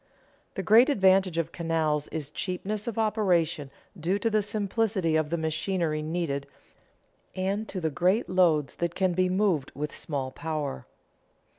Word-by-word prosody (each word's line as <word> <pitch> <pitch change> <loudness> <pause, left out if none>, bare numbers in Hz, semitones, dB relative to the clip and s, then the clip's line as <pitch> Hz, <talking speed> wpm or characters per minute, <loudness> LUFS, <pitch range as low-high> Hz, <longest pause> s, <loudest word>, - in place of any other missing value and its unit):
The - - -3
great 230 +6 +6
advantage 190 - +3
of 165 0 -1
canals 160 -3 0
is 150 -2 -5
cheapness 195 +6 -3
of 230 - -3
operation 185 -10 +1 0.3
due 180 +2 0
to 225 +2 0
the 215 0 +3
simplicity 205 -4 0
of 155 -1 +1
the 170 - -1
machinery 160 0 -1
needed 155 -3 -2 0.9
and 195 +4 -1
to 190 - -4
the 160 -3 -1
great 185 +9 +2
loads 170 -6 +2
that 170 0 -2
can 185 -2 +1
be 185 +1 +2
moved 185 -7 +1
with 150 +1 -4
small 135 -4 -3
power. 150 - -4
175 Hz, 150 wpm, -27 LUFS, 155-195 Hz, 0.9 s, great